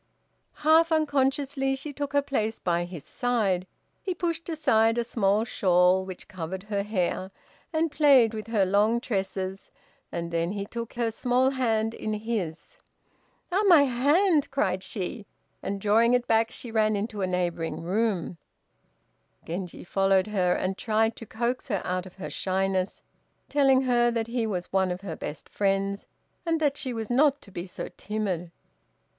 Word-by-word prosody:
Half 325 Hz, +2 st, +6 dB
unconsciously 275 Hz, -2 st, +1 dB
she 285 Hz, +2 st, -6 dB
took 285 Hz, 0 st, -4 dB
her 285 Hz, 0 st, +3 dB
place 220 Hz, -6 st, -1 dB
by 175 Hz, -1 st, 0 dB
his 175 Hz, -5 st, -8 dB
side. 210 Hz, -8 st, 0 dB, 0.3 s
He 370 Hz, -2 st, -3 dB
pushed 335 Hz, -1 st, -3 dB
aside 225 Hz, -8 st, +3 dB
a 235 Hz, -, +2 dB
small 210 Hz, -2 st, +1 dB
shawl 185 Hz, -4 st, +3 dB
which 185 Hz, -1 st, -8 dB
covered 185 Hz, +1 st, -6 dB
her 205 Hz, -1 st, -2 dB
hair, 190 Hz, -2 st, -1 dB, 0.4 s
and 320 Hz, -1 st, +1 dB
played 275 Hz, -6 st, +5 dB
with 215 Hz, -1 st, -5 dB
her 215 Hz, -4 st, +2 dB
long 210 Hz, +5 st, +3 dB
tresses, 195 Hz, -4 st, -3 dB, 0.4 s
and 170 Hz, 0 st, -4 dB
then 170 Hz, +2 st, 0 dB
he 200 Hz, -1 st, -3 dB
took 230 Hz, +2 st, -6 dB
her 235 Hz, -1 st, -1 dB
small 250 Hz, +3 st, +2 dB
hand 225 Hz, -4 st, 0 dB
in 215 Hz, -, -3 dB
his. 215 Hz, -, -4 dB, 0.7 s
"Ah, 380 Hz, +3 st, +2 dB
my 335 Hz, -6 st, +8 dB
hand!" 290 Hz, +6 st, +3 dB
cried 190 Hz, -9 st, 0 dB
she, 200 Hz, +2 st, -5 dB, 0.3 s
and 200 Hz, 0 st, -3 dB
drawing 225 Hz, +4 st, +4 dB
it 245 Hz, 0 st, 0 dB
back, 225 Hz, 0 st, +3 dB
she 240 Hz, -, -7 dB
ran 215 Hz, -1 st, +2 dB
into 210 Hz, 0 st, -3 dB
a 190 Hz, -, +1 dB
neighboring 175 Hz, -3 st, -2 dB
room. 185 Hz, -2 st, -1 dB, 1.1 s
Genji 175 Hz, +1 st, -5 dB
followed 195 Hz, +1 st, +2 dB
her, 190 Hz, -4 st, +1 dB
and 185 Hz, +1 st, -2 dB
tried 220 Hz, +1 st, +1 dB
to 225 Hz, -, -9 dB
coax 240 Hz, +5 st, -2 dB
her 205 Hz, -7 st, 0 dB
out 180 Hz, 0 st, -2 dB
of 180 Hz, -, -15 dB
her 195 Hz, -, -7 dB
shyness, 190 Hz, 0 st, -1 dB, 0.5 s
telling 270 Hz, -2 st, +4 dB
her 240 Hz, -2 st, +3 dB
that 230 Hz, -1 st, -1 dB
he 235 Hz, 0 st, -1 dB
was 180 Hz, -4 st, -4 dB
one 190 Hz, -1 st, +3 dB
of 180 Hz, +1 st, -4 dB
her 180 Hz, -5 st, -5 dB
best 150 Hz, -, -7 dB
friends, 195 Hz, 0 st, -1 dB, 0.4 s
and 330 Hz, -2 st, 0 dB
that 290 Hz, -3 st, +2 dB
she 260 Hz, -3 st, -4 dB
was 225 Hz, -1 st, -4 dB
not 280 Hz, +3 st, +4 dB
to 195 Hz, -, -14 dB
be 175 Hz, +1 st, -6 dB
so -, -, -6 dB
timid. 195 Hz, -5 st, -3 dB
220 Hz, 165 wpm, -27 LUFS, 190-255 Hz, 1.1 s, my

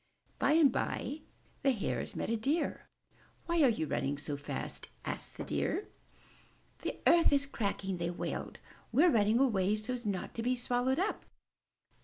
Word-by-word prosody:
By 285 Hz, -, +4 dB
and 310 Hz, -4 st, +6 dB
by 285 Hz, +4 st, -2 dB, 0.4 s
the 275 Hz, -, +3 dB
Hares 215 Hz, -, -3 dB
met -, -, -2 dB
a -, -, +2 dB
Deer. 280 Hz, +9 st, -1 dB, 0.6 s
''Why 340 Hz, -1 st, +2 dB
are 265 Hz, -, +7 dB
you 215 Hz, -9 st, 0 dB
all -, -, -9 dB
running 140 Hz, +1 st, 0 dB
so 145 Hz, 0 st, -3 dB
fast?*' 145 Hz, +1 st, -5 dB, 0.2 s
asked -, -, -5 dB
the -, -, -4 dB
Deer. 415 Hz, -, -1 dB, 0.9 s
'The -, -, -4 dB
earth 340 Hz, -1 st, +6 dB
is 280 Hz, -1 st, +3 dB
cracking!" 200 Hz, -7 st, -2 dB
they 170 Hz, 0 st, -1 dB
wailed. 175 Hz, -, -4 dB, 0.3 s
We*re 305 Hz, +9 st, +6 dB
running 215 Hz, 0 st, +4 dB
away 210 Hz, -6 st, +3 dB
so's 240 Hz, +2 st, -4 dB
not 195 Hz, -3 st, -2 dB
to 230 Hz, -, -3 dB
be 250 Hz, +2 st, +1 dB
swallowed 245 Hz, +1 st, +1 dB
up!" 385 Hz, +5 st, -1 dB
240 Hz, 165 wpm, -33 LUFS, 200-280 Hz, 0.9 s, are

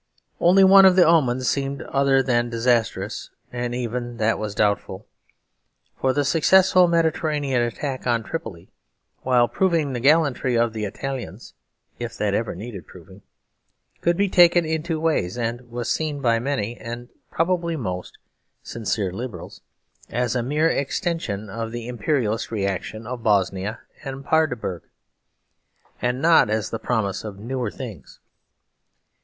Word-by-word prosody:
Only 185 Hz, +3 st, +5 dB
one 195 Hz, 0 st, +8 dB
of 185 Hz, -1 st, +6 dB
the 185 Hz, -, +6 dB
omens 130 Hz, -6 st, +3 dB
seemed 140 Hz, 0 st, -1 dB
other 135 Hz, -1 st, +2 dB
than 120 Hz, -2 st, +1 dB
disastrous; 115 Hz, -1 st, 0 dB, 0.2 s
and 120 Hz, 0 st, -3 dB
even 120 Hz, 0 st, -4 dB
that 110 Hz, 0 st, +1 dB
was 105 Hz, -1 st, -4 dB
doubtful. 100 Hz, -1 st, 0 dB, 0.9 s
For 130 Hz, -, +2 dB
the 145 Hz, +2 st, 0 dB
successful 180 Hz, +4 st, +5 dB
Mediterranean 155 Hz, -5 st, +1 dB
attack 130 Hz, +3 st, -3 dB
on 115 Hz, -2 st, +1 dB
Tripoli 105 Hz, -, -7 dB, 0.5 s
while 125 Hz, -2 st, +3 dB
proving 165 Hz, -6 st, 0 dB
the 120 Hz, -, -2 dB
gallantry 140 Hz, -3 st, +2 dB
of 115 Hz, -1 st, +1 dB
the 110 Hz, -1 st, -3 dB
Italians 120 Hz, -2 st, -6 dB, 0.5 s
(if -, -, -5 dB
that -, -, 0 dB
ever -, -, -1 dB
needed 100 Hz, 0 st, -8 dB
proving) 95 Hz, +2 st, -15 dB, 0.8 s
could 170 Hz, 0 st, +1 dB
be 200 Hz, +1 st, +2 dB
taken 175 Hz, -2 st, +5 dB
in 160 Hz, 0 st, -1 dB
two 165 Hz, -1 st, -3 dB
ways, 155 Hz, -, 0 dB
and 120 Hz, +1 st, -3 dB
was 120 Hz, 0 st, -3 dB
seen 155 Hz, -2 st, -1 dB
by 115 Hz, -4 st, +2 dB
many, 120 Hz, -3 st, -2 dB
and 120 Hz, +1 st, -7 dB, 0.2 s
probably 170 Hz, 0 st, 0 dB
most, 90 Hz, -, -5 dB, 0.5 s
sincere 105 Hz, -4 st, -2 dB
liberals 120 Hz, +3 st, -7 dB, 0.5 s
as 120 Hz, +1 st, -1 dB
a 125 Hz, -, +1 dB
mere 150 Hz, +6 st, +1 dB
extension 140 Hz, -, -2 dB
of 115 Hz, +3 st, -5 dB
the 120 Hz, 0 st, -6 dB
Imperialist 120 Hz, -2 st, -1 dB
reaction 105 Hz, +1 st, -3 dB
of 125 Hz, +1 st, -6 dB
Bosnia 100 Hz, 0 st, 0 dB, 0.2 s
and 135 Hz, 0 st, -7 dB
Paardeberg, 125 Hz, -, 0 dB, 1.2 s
and 125 Hz, +1 st, 0 dB
not 165 Hz, -9 st, +5 dB
as 110 Hz, 0 st, -1 dB
the 115 Hz, -, -3 dB
promise 110 Hz, -5 st, -1 dB
of 105 Hz, -3 st, -7 dB
newer 120 Hz, +2 st, -3 dB
things. 105 Hz, -, -9 dB
125 Hz, 140 wpm, -23 LUFS, 110-150 Hz, 1.2 s, one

